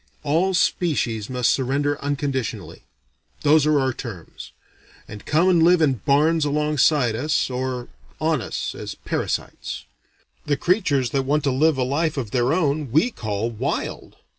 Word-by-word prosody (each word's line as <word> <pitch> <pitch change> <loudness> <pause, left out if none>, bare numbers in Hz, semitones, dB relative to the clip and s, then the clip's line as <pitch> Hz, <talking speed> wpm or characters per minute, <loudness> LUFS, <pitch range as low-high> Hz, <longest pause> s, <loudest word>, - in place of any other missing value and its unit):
All 170 +6 +1
species 125 - 0
must 125 -2 +1
surrender 140 +2 0
unconditionally 140 -4 -3 0.6
those 150 0 +4
are 150 -1 +3
our 130 -1 0
terms 110 -10 -9 0.6
and 105 0 -10
come 160 +5 +3
and 175 -3 +4
live 175 +2 +5
in 150 -4 +3
barns 155 +3 +3
alongside 150 -4 +2
us; 145 +2 0
or 125 -1 -3 0.3
on 155 -4 +1
us, 105 - -4
as - - -7
parasites. - - -4 0.6
The 145 - +1
creatures 145 - +1
that 135 - +1
want 145 +2 +1
to 140 - +1
live 150 +3 +2
a 130 - +1
life 150 +4 -1
of 115 -6 -3
their 125 +2 +1
own, 150 -4 0
we 160 - +3
call 110 - -3
wild. 110 - -4
145 Hz, 150 wpm, -22 LUFS, 125-155 Hz, 0.6 s, live